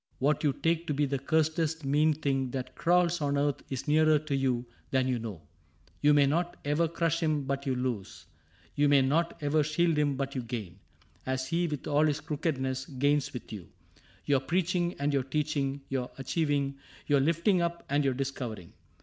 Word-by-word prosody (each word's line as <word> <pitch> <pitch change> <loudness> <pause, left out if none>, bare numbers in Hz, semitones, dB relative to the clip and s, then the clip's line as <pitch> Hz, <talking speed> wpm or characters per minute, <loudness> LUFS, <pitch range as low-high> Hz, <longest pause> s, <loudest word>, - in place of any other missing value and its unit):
What 145 +5 +1
you 145 - +3
take 165 +4 -1
To 150 - -1
be 145 +1 +2
the 140 -1 -2
cursedest 160 +1 0
mean 150 +3 +3
thing 135 -3 -1
that 130 0 -5
crawls 175 +1 +2
On 140 -1 +1
earth 145 -1 0
is 135 +1 -4
nearer 155 +1 +5
to 150 -1 -3
you 130 -3 0 0.2
than 130 -1 +1
you 125 -2 0
know: 105 -8 -7 0.6
You 150 0 +5
may 145 -1 +6
not 170 +5 0
ever 150 +3 +2
crush 165 0 0
him 155 -3 0
but 140 +1 -3
you 130 - +1
lose. 125 -6 -4 0.5
You 145 0 +3
may 140 -2 +5
not 160 +6 +1
ever 150 +2 +3
shield 155 +1 +1
him 145 -2 +2
but 135 0 -3
you 130 - -2
gain 110 -7 -6 0.2
— - - -34
As 130 0 -2
he, 170 +1 +1
with 150 -4 -4
all 150 +1 +3
his 150 0 0
crookedness, 135 -4 -2
gains 145 +1 +1
with 125 -2 -8
you. 100 -5 -8 0.6
Your 140 -2 +3
preaching 175 +4 0
and 145 +1 0
your 140 - +2
teaching, 140 0 -1
your 130 -2 -2
achiev. 145 +4 -1
ing. 140 -1 0 0.3
Your 145 -1 +3
lifting 170 +6 +2
up 170 0 -2
and 145 +1 +1
your 135 -2 +1
discovering. 125 -9 -5
145 Hz, 195 wpm, -29 LUFS, 135-155 Hz, 0.6 s, may